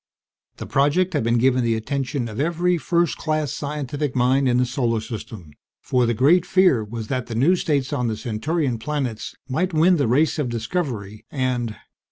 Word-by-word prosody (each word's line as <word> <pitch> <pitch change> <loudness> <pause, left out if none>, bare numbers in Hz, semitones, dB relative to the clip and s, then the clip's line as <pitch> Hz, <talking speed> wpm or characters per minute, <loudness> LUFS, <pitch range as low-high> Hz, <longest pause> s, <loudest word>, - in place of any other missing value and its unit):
The - - -6
project 150 +7 +2
had 145 - 0
been 115 +1 +2
given 130 +1 +3
the 115 -1 +1
attention 135 +2 -2
of 110 +1 -7
every 170 +3 +1
first 170 0 0
class 155 -3 -1
scientific 145 -1 -3
mind 130 +2 +3
in 120 - +2
the 125 - +3
Solar 120 -2 0
System; 110 -7 -8 0.3
for 125 -2 +1
the 120 - +1
great 155 +9 +4
fear 180 - +3
was 110 +1 -6
that 130 -2 -2
the 115 - -5
new 145 +11 +4
states 145 -5 -1
on 125 -4 0
the 110 -1 -2
Centaurian 130 +3 -2
planets 130 -4 -3
might 165 +6 -1
win 170 +3 +5
the 140 - +1
race 150 +7 +2
of 140 -5 -1
discovery 115 - -4
and 125 -5 -2
130 Hz, 185 wpm, -22 LUFS, 115-155 Hz, 0.3 s, win